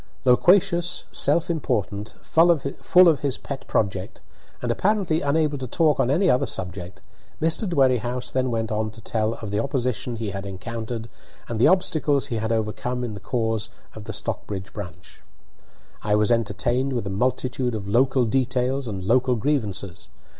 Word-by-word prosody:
Loquacious, 175 +6 +3
self 170 - +2
important, 105 - -2
full 165 +2 +4
of 165 +1 +4
his 140 -3 -1
pet 140 -1 -7
project, 95 -3 -1 0.4
and 120 - -1
apparently 185 - +1
unable 145 0 +1
to 130 - -4
talk 150 +3 +2
on 120 - +2
any 175 +8 +3
other 125 - +3
subject, 90 +1 -4 0.4
Mr. 165 +6 +1
Dwerrihouse 125 -5 +1
then 130 -1 +1
went 115 -2 -2
on 110 0 -1
to 105 - -12
tell 110 0 -1
of 110 -3 -7
the 105 - 0
opposition 125 -2 -2
he 110 -3 -4
had 95 0 -5
encountered 110 +4 -5 0.4
and 115 -2 -3
the 120 - +6
obstacles 155 -6 +2
he 120 -5 -3
had 110 +1 -2
overcome 115 +3 -2
in 120 -3 -3
the 100 - -7
cause 110 -4 -2 0.2
of 110 -1 -10
the - - -5
Stockbridge 95 -2 -4
branch. 90 -4 -9 0.8
I 105 -1 +1
was 105 +1 +2
entertained 120 +4 0
with 120 -5 -2
a 100 - -3
multitude 125 +2 -1
of 100 -2 -5
local 130 +4 +3
details 130 +2 0
and 100 -4 -4
local 125 +5 +3
grievances. 105 - -2
120 Hz, 160 wpm, -24 LUFS, 105-140 Hz, 0.8 s, the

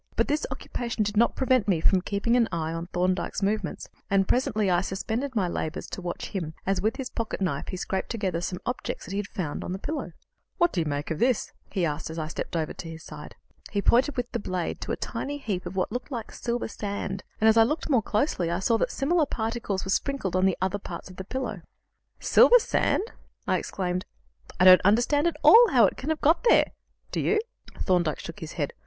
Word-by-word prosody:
But - - +2
this 300 +1 0
occupation 235 -2 -3
did 210 +1 -3
not 235 +3 +3
prevent 255 -5 +2
me 185 -5 +2
from 185 +3 +3
keeping 200 +5 0
an 235 -2 +3
eye 160 -2 -2
on 165 +1 -4
Thorndyke's 185 +2 -1
movements, 205 -1 -1 0.2
and 195 -1 +3
presently 215 -5 +1
I 175 -1 +3
suspended 225 +8 -3
my 195 -5 +2
labours 165 -1 -3
to - - -5
watch 175 -1 -5
him 165 -6 -4
as, 195 0 +1
with 220 +3 +1
his 265 -2 -5
pocket 230 -2 -3
knife, 165 -8 -1
he 185 - -4
scraped 190 +1 -3
together 190 -7 -2
some 180 +1 -3
objects 245 - -4
that - - -9
he 195 - -2
had 205 - -3
found 160 -6 -4
on 180 - -4
the - - -3
pillow. 270 - -4 0.4
"What 345 0 +3
do 175 - +1
you 160 - -2
make 145 +2 -3
of 160 - -2
this?" 245 -2 +1 0.2
he 185 -4 0
asked, 150 0 -3
as 160 - -7
I 155 -1 -3
stepped 170 - -5
over 160 -2 -1
to 165 - -8
his 165 0 -9
side. - - -10 0.3
He 205 - -1
pointed 255 +7 +3
with 245 0 -2
the 235 - -2
blade 185 -4 -3
to - - -4
a - - +1
tiny 290 +1 -4
heap 195 -10 -3
of 180 - -7
what 185 - 0
looked 245 +4 -4
like 235 -5 -5
silver 240 0 -2
sand, 200 -3 -4 0.2
and, 220 - +4
as 220 - +6
I 225 - +7
looked 290 +8 +1
more 260 -7 +3
closely, 210 - 0
I 170 - 0
saw 210 +5 +2
that - - +1
similar 310 +2 +1
particles 220 -5 -2
were 190 - -2
sprinkled 260 -7 -1
on 190 +1 +4
other 190 +2 -1
parts 190 - -8
of 180 - -14
the 190 - -5
pillow. 260 +7 -4 0.6
"Silver - - +7
sand!" 435 - +1 0.4
I - - +2
exclaimed. 180 -1 -3 0.5
"I 180 - +5
don't 185 0 +9
understand 240 - +3
at 340 - -1
all 470 0 +9
how 250 -7 +6
it - - 0
can 275 - -5
have 315 -1 -1
got 320 +9 +3
there. - - +5 0.4
Do - - -1
you?" 430 - +2 0.4
Thorndyke 175 -5 +1
shook 165 - -8
his 160 0 -7
head. 145 -4 -2
200 Hz, 230 wpm, -26 LUFS, 180-245 Hz, 0.6 s, don't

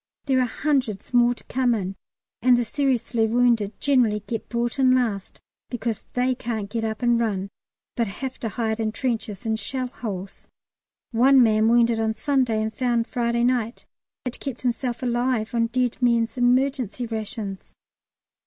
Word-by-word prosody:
There 265 -2 +2
are 250 - +2
hundreds 255 -6 -1
more 240 0 +4
to - - -14
come 250 -2 +1
in, 195 -2 -3 0.5
and 250 0 +5
the 240 - +1
seriously 245 -3 0
wounded 230 -3 +2
generally 240 -7 +2
get 225 +1 -5
brought 240 +3 -2
in 255 -1 +5
last, 220 -6 -1 0.3
because 230 -3 -3
they 250 +1 +2
can't 220 -4 -4
get 230 -1 -2
up 220 +2 -3
and 240 -1 +3
run, 200 -4 -1 0.5
but 235 -2 0
have 260 +6 -6
to 230 - -3
hide 220 0 -2
in 215 -1 -1
trenches 230 -3 -3
and 220 0 0
shell 255 0 -3
holes. 200 -7 -7 0.6
One 255 +3 +6
man, 220 -1 +3
wounded 235 -1 +4
on 220 0 0
Sunday 250 -4 +1
and 220 0 -3
found 240 -2 +1
on - - -34
Friday 235 -1 0
night, 245 -2 0 0.4
had 250 - -4
kept 265 -3 -6
himself 245 0 -2
alive 240 -2 0
on 230 -1 +2
dead 250 +1 -1
men's 230 -2 +2
emergency 250 -1 +1
rations. 215 -3 -6
235 Hz, 165 wpm, -24 LUFS, 220-250 Hz, 0.6 s, One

